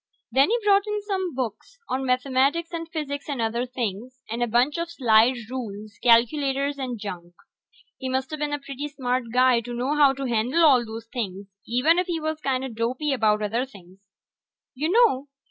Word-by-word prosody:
Then 270 - +4
he 470 - +3
brought 400 0 +4
in 420 0 -1
some 375 -6 -2
books 250 - -5
on 265 +1 -2
mathematics 270 +6 +1
and 330 -1 -5
physics 290 -3 -5
and 280 -3 -3
other 235 +2 -1
things, 250 +1 -5
and 235 +1 -3
a 240 - +2
bunch 245 +7 +2
of 335 0 -3
slide 240 -5 +4 0.2
rules, 215 -5 -6
calculators, 275 +4 +3
and 255 -3 -3
junk. 175 -4 -7 0.6
He 260 - -4
musta 260 +3 -2
been 295 -1 -3
a 290 - 0
pretty 280 0 -6
smart 255 -3 -2
guy 250 0 +4
to 240 +1 -6
know 260 +5 -1
how 285 -2 +5
to 270 0 -5
handle 245 +7 +2
all 260 -5 +6
those 225 0 -8
things, 200 -5 -5 0.2
even 285 +9 +3
if 365 - -1
he 340 -2 -1
was 315 0 -3
kinda 265 -1 -1
dopey 245 +6 -1
about 215 -4 +2
other 225 +4 0
things. 190 -7 -14 0.7
You 300 +5 -2
know 385 - +3
260 Hz, 185 wpm, -25 LUFS, 235-295 Hz, 0.7 s, all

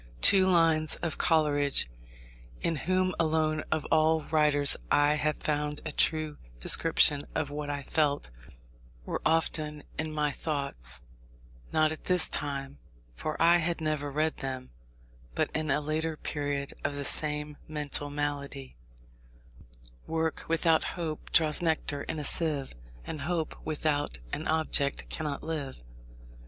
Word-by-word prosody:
Two 190 -1 +7
lines 165 -4 +3
of 165 - -2
Coleridge, 145 - +3 0.7
in 165 - -1
whom 185 +4 0
alone 155 -1 +1
of 155 -2 0
all 160 0 +3
writers 150 -3 +4
I 145 0 +4
have 150 0 0
found 150 -1 -1
a 155 - -2
true 155 0 +1 0.2
description 145 - +4
of 150 -3 -1
what 145 0 -5
I 145 -1 -3
felt, 145 - 0 0.7
were - - -3
often 155 -2 0 0.2
in 155 0 -2
my 150 -1 0
thoughts, 135 - -2 0.7
not 155 0 +3
at 155 - -8
this 180 -2 +4
time 140 - -2 0.3
(for 155 - -5
I 170 +1 +6
had 170 0 -1
never 155 -2 -2
read 155 +3 0
them), 130 -1 -5 0.6
but - - 0
in 155 -1 -2
a 145 +2 +2
later 155 +1 -2
period 145 -2 -3
of 145 0 -1
the 140 0 -3
same 150 0 +1
mental 145 -1 -1
malady: 145 - -4 1.3
"Work 160 0 -2
without 165 0 +3
hope 160 -3 -5
draws 155 -2 +4
nectar 160 -3 -1
in 160 - -5
a 150 - -4
sieve, 145 -2 +1 0.3
And 155 - -6
hope 160 +1 -2
without 150 - -1 0.2
an 155 - -3
object 155 -3 0
cannot 150 -3 -3
live." 145 - -5
150 Hz, 135 wpm, -29 LUFS, 145-160 Hz, 1.3 s, Two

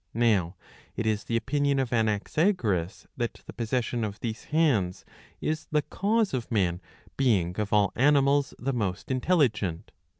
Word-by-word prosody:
Now 105 -7 +2 0.4
it 115 - -2
is 110 -1 0
the 115 - 0
opinion 140 +3 0
of 130 -3 -1
Anaxagoras, 110 - 0
that 120 -2 -3
the - - -9
possession 120 0 -1
of 105 -1 -4
these 115 -2 -5
hands 130 - +1 0.3
is 155 0 -2
the 150 -1 +1
cause 210 +3 0
of 125 -3 -3
man 90 -5 +1 0.4
being 100 -9 +1
of 105 -2 -2
all 105 -2 +3
animals 140 0 +3
the 135 +2 -2
most 100 -2 -2
intelligent. 125 - +1
115 Hz, 145 wpm, -27 LUFS, 105-140 Hz, 0.4 s, all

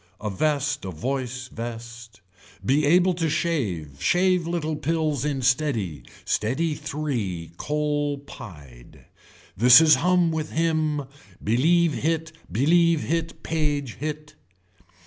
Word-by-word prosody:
A 105 -1 -3
vest 145 +5 0
a 95 - -4
voice 130 - -4
vest. 115 -1 -8 0.4
Be 145 +3 +2
able 180 +3 +4
to 165 -2 -1
shave, 105 - -2
shave 180 -1 +2
little 160 -2 -2
pills 155 -2 -1
in 140 -3 -2
steady, 115 - 0 0.2
steady 135 +9 0
three, 130 - -4
coal 150 -1 -1
pied. 75 - -13 0.5
This 125 +5 +8
is 160 -1 +6
hum 180 -1 +3
with 155 -1 -3
him, 155 -2 0 0.4
believe 160 +9 +3
hit 160 +1 -1 0.2
believe 165 +5 +3
hit 165 +1 -3
page 145 -6 -2
it. 150 0 -5
145 Hz, 115 wpm, -24 LUFS, 120-160 Hz, 0.5 s, This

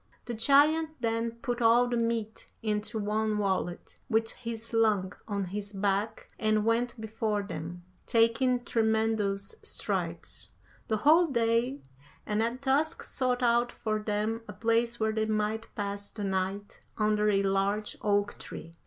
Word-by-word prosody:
The 240 - -4
giant 295 +6 +3
then 230 0 0
put 245 0 -2
all 235 +2 +5
the 245 - -1
meat 230 -2 -2
into 215 +1 -1
one 215 0 0
wallet, 190 -3 -2
which 225 -2 +1
he 230 -1 -5
slung 220 -4 +1
on 200 -2 -1
his 200 +2 -5
back 200 +2 -1
and 215 -1 +2
went 235 +1 +1
before 220 -1 -1
them, 175 -1 -6 0.2
taking 240 +2 +3
tremendous 220 - +1
strides, - - -3 0.4
the 220 - +1
whole 320 +9 +5
day, 235 0 +1 0.4
and 210 +1 0
at 235 +4 -2
dusk 285 +4 +1
sought 250 -1 -1
out 240 0 +3
for 215 -1 -2
them 215 +2 -1
a 205 - -7
place 230 +3 +1
where 220 0 +2
they 220 0 0
might 215 +1 -1
pass 200 0 -3
the 210 - -6
night 195 +1 -2 0.2
under 210 -1 +2
a 200 -1 +3
large 195 +2 0
oak 205 0 +1
tree. 165 - -8
220 Hz, 145 wpm, -29 LUFS, 205-235 Hz, 0.4 s, all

